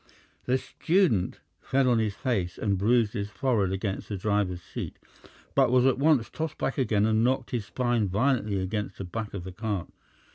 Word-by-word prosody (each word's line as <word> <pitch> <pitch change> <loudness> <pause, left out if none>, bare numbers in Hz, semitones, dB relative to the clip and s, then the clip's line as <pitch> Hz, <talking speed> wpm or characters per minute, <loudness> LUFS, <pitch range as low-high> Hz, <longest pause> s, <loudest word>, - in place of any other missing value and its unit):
The 130 +1 +2
student 160 - +1 0.2
fell 135 -1 +1
on 120 -2 +4
his 105 -3 0
face 100 -10 -1
and 100 -2 0
bruised 110 +3 +2
his 100 -3 -3
forehead 105 -3 +1
against 95 0 -3
the 100 - -3
driver's 95 -3 0
seat, - - -6 0.6
but - - +4
was 125 0 +4
at 135 -1 +3
once 140 -6 +4
tossed 160 -1 -4
back 135 - -2
again 110 -5 +2
and 110 0 +2
knocked 130 0 0
his 115 -4 -2
spine 120 -2 0
violently 105 0 +1
against 100 +1 -3
the - - -5
back 105 +3 -5
of 95 - -5
the 95 - -7
cart. 105 -2 -3
110 Hz, 185 wpm, -27 LUFS, 100-125 Hz, 0.6 s, on